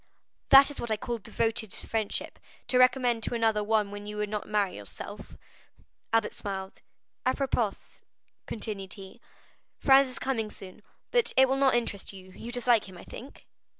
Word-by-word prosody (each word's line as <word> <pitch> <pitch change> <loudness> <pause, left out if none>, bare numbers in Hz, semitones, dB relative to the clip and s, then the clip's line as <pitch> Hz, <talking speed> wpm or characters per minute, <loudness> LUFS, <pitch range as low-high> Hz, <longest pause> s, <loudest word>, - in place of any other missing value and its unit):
'" - - -53
"That 275 +1 +9
is 290 - -6
what 235 - -4
I 220 - +1
call 235 +2 -4
devoted 225 0 0
friendship, 220 -2 -3 0.3
to 250 - +4
recommend 250 -2 +4
to 235 - -1
another 220 -2 +2
one 210 -1 +1
whom 205 0 -7
you 210 0 -6
would 210 0 -1
not 210 0 -4
marry 205 -3 +1
yourself." 100 -1 -9 0.7
Albert 225 -1 +2
smiled. 190 -1 -6 0.4
"Apropos," 255 -5 +1 0.7
continued 205 -4 -4
he, 195 -2 -11 0.6
"Franz 270 0 +6
is 255 - -8
coming 225 -5 -1
soon, 190 0 -11 0.3
but 480 -1 +2
it 265 0 +7
will 265 - +1
not 270 -2 +3
interest 210 -5 -2
you; 185 -1 -12
you 230 +5 -8
dislike 240 -4 +2
him, 185 - -12
I - - -11
think?" 265 +4 -11
225 Hz, 170 wpm, -28 LUFS, 205-250 Hz, 0.7 s, That